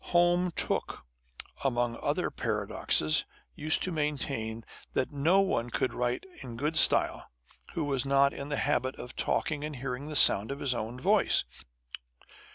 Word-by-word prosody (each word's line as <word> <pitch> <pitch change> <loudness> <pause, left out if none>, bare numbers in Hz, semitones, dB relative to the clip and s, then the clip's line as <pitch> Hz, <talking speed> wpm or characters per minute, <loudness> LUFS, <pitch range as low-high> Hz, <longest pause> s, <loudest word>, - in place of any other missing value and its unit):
Home 175 +1 +4
Tooke, - - -2 0.6
among 120 -3 0
other - - -1
paradoxes, 75 0 +1 0.3
used 155 +1 -1
to 185 - -2
maintain, 135 -8 -3 0.3
that 130 - -1
no 160 +7 +3
one 120 -12 -1
could 125 - -1
write 125 +4 -2 0.2
a 135 - -8
good 150 +6 -2
style - - +4 0.5
who 165 - -1
was 135 -3 0
not 140 0 +3
in 140 +1 -7
the 145 - -1
habit 130 -2 0
of 125 - -9
talking 150 -2 -1
and 150 -1 -5
hearing 130 +2 -5
the 155 - -5
sound 105 -6 +6
of 140 - -5
his 135 -3 +1
own 120 +1 -5
voice. - - +3
140 Hz, 155 wpm, -29 LUFS, 120-150 Hz, 0.6 s, sound